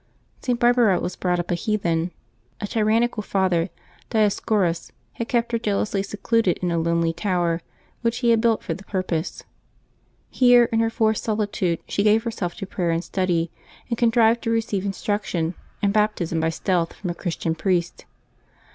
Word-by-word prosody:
[t. 250 - -1
Barbara 240 -5 +4
was 180 - -3
brought 180 -1 0
up 175 - -3
a - - +3
heathen. 175 -3 0 0.5
A - - -3
tyrannical 220 +2 +1
father, 185 -4 +1 0.4
Dioscorus, 205 -5 +1 0.2
had 230 - -4
kept 235 -1 0
her 230 - +1
jealously 205 -2 0
secluded 210 0 0
in 180 -1 -2
a 170 - +1
lonely 165 0 +1
tower 175 -2 0 0.4
which 230 0 0
he 235 - +5
had 225 -1 +4
built 230 -1 +2
for - - -2
the 195 - -9
purpose. 185 -4 -3 0.9
Here 245 -1 +6
in 225 - +2
her 225 0 +2
forced 220 -2 +1
solitude, 205 -5 -1
she - - 0
gave 215 +2 +4
herself 210 -7 -3
to 195 - -5
prayer 180 -2 -2
and 165 +1 0
study, 170 -2 0 0.4
and 235 - 0
contrived 230 -1 +4
to 230 - -2
receive 225 -4 0
instruction 195 -4 -1 0.3
and 200 -1 +3
Baptism 210 -6 +1
by 160 0 +1
stealth 170 0 0
from 180 -4 -4
a - - -3
Christian 170 -2 -2
priest. 175 0 -1
200 Hz, 165 wpm, -23 LUFS, 175-225 Hz, 0.9 s, Here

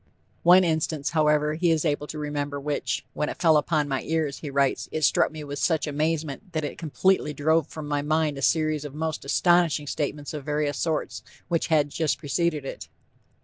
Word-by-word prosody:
One 180 +2 +7
instance, 160 -3 -1
however, 150 -2 +2
he 170 +2 +1
is 160 0 +2
able 150 -1 0
to 155 - -7
remember 145 -1 -3
which 145 +1 -2
"when 150 - -2
it - - -6
fell 165 -3 +5
upon 150 0 +1
my 135 -2 -1
ears," 155 -3 -2
he 150 - -6
writes, 140 -1 0
"it 155 - -2
struck - - +3
me 155 -1 -7
with 145 -1 -6
such 160 -4 +1
amazement, 155 +3 -2
that 155 -1 -1
it 145 - -5
completely 165 0 +1
drove 160 +1 +2
from 155 -1 -8
my 145 -1 0
mind 155 -1 0
a - - -6
series 155 0 +1
of 145 -1 -8
most 160 0 -3
astonishing 170 0 +3
statements 145 +1 -3
of 150 -2 -5
various 150 -2 -1
sorts 160 -2 -2 0.3
which 170 -2 0
had 150 -3 +2
just 160 -1 0
preceded 155 -1 -1
it." - - -7
150 Hz, 195 wpm, -25 LUFS, 145-160 Hz, 0.3 s, One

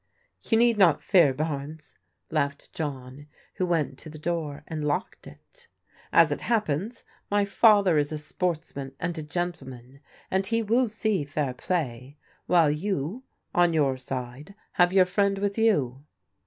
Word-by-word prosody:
" - - -48
You 225 - +4
need 235 -2 +3
not 175 -6 +4
fear, 170 -8 +5
Barnes," 150 +1 -5 0.4
laughed 140 -2 -2
John, 140 -2 -6 0.3
who 185 - 0
went 155 -6 -1
to 155 - -11
the 155 - -10
door 155 -3 -3
and 155 -2 -4
locked 145 -1 -3
it. 485 -1 -17 0.4
"As - - +5
it - - -2
happens, 215 - -1 0.3
my 205 0 +2
father 200 -5 +4
is 145 +1 -1
a 155 - -3
sportsman 150 -4 -4
and 175 - -2
a - - -3
gentleman, 145 -6 -5 0.3
and 190 +1 +2
he 230 +1 0
will 235 +4 +2
see 215 -5 0
fair 145 -2 -2
playi 130 -4 -3 0.3
while 165 -4 +4
you, 180 - -2 0.3
on 175 -1 +3
your 140 -4 +2
side, 130 +6 -7 0.2
have 175 0 +3
your 190 -1 +5
friend 195 +2 +1
with 200 0 -1
you." 140 - +1
160 Hz, 155 wpm, -26 LUFS, 140-195 Hz, 0.4 s, fear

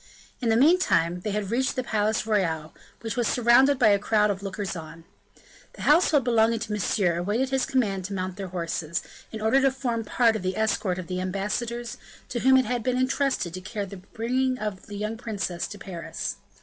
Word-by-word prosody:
In 240 - 0
the 225 - +4
meantime 230 - +3
they 210 - -4
had 205 -1 -2
reached 260 +4 +1
the 255 - -1
Palais 215 -2 0
Royal, 165 -8 0 0.3
which 225 -2 -4
was 240 -3 +1
surrounded 255 +4 +5
by 240 -4 +5
a 200 -1 +4
crowd 210 0 +2
of 195 -1 -5
lookers 195 0 -4
on. 165 0 -9 0.7
The - - -9
household 300 -2 +4
belonging 230 -1 +3
to 220 -1 -4
Monsieur 195 -3 +1
awaited 220 +9 0
his 265 -1 +1
command 200 -8 0
to 200 - -5
mount 185 -1 -3
their 195 -1 -5
horses, 170 -2 -3 0.3
in 220 - -6
order 225 +5 +3
to 270 - +5
form 245 -4 -2
part 225 +1 +2
of 215 - -3
the 185 0 -2
escort 210 -4 0
of 185 - -5
the 185 +1 -3
ambassadors, 230 +5 -3 0.3
to 240 - -2
whom 265 +2 +5
had 250 -2 +2
been 250 +2 0
intrusted 255 - 0
the 185 - -6
care 205 +2 -4
of 195 -1 -10
bringing 255 +3 0
the 205 -3 -6
young 215 +2 -3
princess 200 -7 -3
to 205 - -9
Paris. 165 - -5
215 Hz, 200 wpm, -26 LUFS, 185-245 Hz, 0.7 s, surrounded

